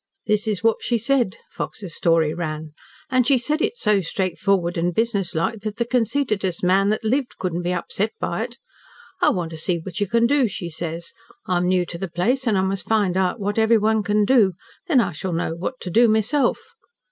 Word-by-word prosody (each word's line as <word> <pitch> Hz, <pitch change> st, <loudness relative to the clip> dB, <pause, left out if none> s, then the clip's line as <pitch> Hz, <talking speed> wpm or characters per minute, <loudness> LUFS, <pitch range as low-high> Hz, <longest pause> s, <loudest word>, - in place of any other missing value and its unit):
"This 210 Hz, 0 st, +1 dB
is 210 Hz, -1 st, -1 dB
what 225 Hz, -1 st, +3 dB
she 240 Hz, -, 0 dB
said," 235 Hz, -3 st, +1 dB, 0.2 s
Fox's 190 Hz, -6 st, -6 dB
story 165 Hz, -2 st, +2 dB
ran, 155 Hz, -2 st, -4 dB, 0.4 s
"and 255 Hz, -2 st, +3 dB
she 275 Hz, -, +5 dB
said 300 Hz, +6 st, -1 dB
it 475 Hz, -, 0 dB
so 210 Hz, -, +2 dB
straightforward 185 Hz, 0 st, 0 dB
and 175 Hz, 0 st, -1 dB
business 205 Hz, -6 st, 0 dB
like 170 Hz, +7 st, -1 dB
that 215 Hz, +1 st, -5 dB
the 235 Hz, -, 0 dB
conceitedest 225 Hz, -7 st, 0 dB
man 195 Hz, +2 st, +3 dB
that 215 Hz, +1 st, -1 dB
lived 255 Hz, +4 st, -1 dB
couldn't 180 Hz, -2 st, -2 dB
be 175 Hz, +1 st, -1 dB
upset 185 Hz, +4 st, -1 dB
by -, -, -2 dB
it. -, -, -11 dB, 0.6 s
'I -, -, +5 dB
want 175 Hz, -3 st, -2 dB
to 160 Hz, -, -7 dB
see 170 Hz, +2 st, 0 dB
what 170 Hz, +1 st, -6 dB
you 205 Hz, -, 0 dB
can 230 Hz, +4 st, +3 dB
do,' 270 Hz, 0 st, +3 dB
she 175 Hz, -4 st, -6 dB
says. 165 Hz, +1 st, -5 dB, 0.3 s
'I 180 Hz, -, +1 dB
am 180 Hz, 0 st, +1 dB
new 180 Hz, -1 st, +2 dB
to 170 Hz, 0 st, -7 dB
the 190 Hz, -, -4 dB
place 240 Hz, +11 st, 0 dB
and 215 Hz, -3 st, +3 dB
I -, -, +3 dB
must 190 Hz, -1 st, -2 dB
find 205 Hz, -5 st, +2 dB
out 190 Hz, +4 st, 0 dB
what 205 Hz, +2 st, -1 dB
everyone 220 Hz, -1 st, +3 dB
can 210 Hz, 0 st, +2 dB
do, 215 Hz, -6 st, +4 dB, 0.3 s
then 300 Hz, -8 st, +4 dB
I 230 Hz, -, +1 dB
shall 175 Hz, +3 st, -4 dB
know 165 Hz, 0 st, -1 dB
what 190 Hz, +10 st, -5 dB
to 180 Hz, -, -5 dB
do 235 Hz, +6 st, +5 dB
myself.' 230 Hz, +5 st, +1 dB
200 Hz, 215 wpm, -22 LUFS, 175-230 Hz, 0.6 s, she